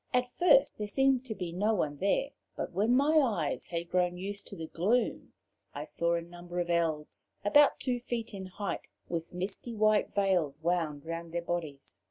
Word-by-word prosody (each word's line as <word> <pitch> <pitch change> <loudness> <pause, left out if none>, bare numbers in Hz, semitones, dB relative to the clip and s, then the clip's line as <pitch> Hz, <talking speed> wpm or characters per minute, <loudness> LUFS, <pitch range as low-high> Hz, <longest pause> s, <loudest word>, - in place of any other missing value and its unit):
At 250 0 +1
first 360 - +4
there 210 - -2
seemed 265 +3 +2
to 220 -4 -4
be 180 -4 -4
no 210 +5 +1
one 145 -6 -1
there, 200 - +1 0.2
but - - -4
when 215 +7 +2
my 300 +4 +5
eyes 205 - 0
had 170 0 -4
grown 180 -1 +1
used 200 +2 -5
to - - -8
the 165 - -5
gloom 205 +10 0 0.4
I - - -4
saw 170 0 0
a 170 - -2
number 175 +1 -7
of 175 0 -1
Elves 160 -3 +1
about 290 +8 +5
two 250 -2 -1
feet 235 -2 -4
in 190 -1 -6
height, 200 +2 -4 0.3
with 165 -1 -3
misty 195 +6 -3
white 215 -1 +3
veils 180 -8 +1
wound 160 -4 0
round 165 0 -5
their 170 0 -2
bodies. 155 -10 -4
180 Hz, 190 wpm, -31 LUFS, 170-225 Hz, 0.4 s, my